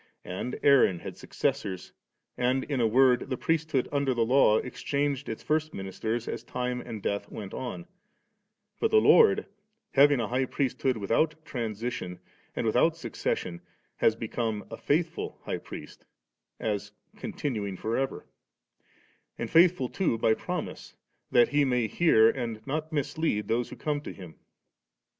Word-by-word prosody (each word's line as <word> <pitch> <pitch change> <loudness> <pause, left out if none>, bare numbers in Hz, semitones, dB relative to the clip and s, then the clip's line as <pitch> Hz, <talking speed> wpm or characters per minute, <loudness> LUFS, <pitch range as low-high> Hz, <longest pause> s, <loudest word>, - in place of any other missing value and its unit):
And 95 +8 -4
Aaron 135 -10 +5
had - - -8
suc - - -13
cessors^ 95 -2 -2 0.4
and 130 +1 +1
in 140 -4 -1
a 115 - +4
word 125 +2 +4
the 130 - -1
priesthood 155 -4 0
under 140 -3 +1
the 115 -1 +2
Law 120 -3 +5
exchanged 140 +3 -2
its 110 - -5
first 155 0 0
ministers 110 +5 -3
as - - -4
time 125 0 -3
and 110 -4 -7
death 100 0 -2
went 100 -3 -7
on; 130 +7 -5 0.9
but 450 - +2
the 440 - +4
Lord 450 0 +6 0.5
having 145 -1 +5
a 115 - -1
high 130 +3 0
priesthood 130 -1 -1
without 115 +10 +1
transition 115 - -4 0.4
and - - -2
with - - +1
oat - - +4
succession, 85 -1 -3 0.4
has 110 - +3
become 110 -1 -3
a - - -6
'&ithful 165 +3 -1
High - - -3
Priest,' - - -10 0.6
as 105 -1 -3 0.2
continuing 105 -9 -3
for 110 +4 -2
ever; 135 0 -2 1.1
and - - -4
fisuthfiLl 165 -6 +4
too 180 -12 +1
by 110 0 +3
promise, - - -5 0.3
that 120 - +5
He 145 0 +3
may 125 -4 +1
hear^ 115 -7 +4
and 115 -4 -4
not 155 +3 -3
mislead 145 -6 -1
those 120 +1 0
who - - -8
come 150 -1 -2
to - - -7
Him. 90 -4 -11
125 Hz, 150 wpm, -28 LUFS, 110-145 Hz, 1.1 s, Lord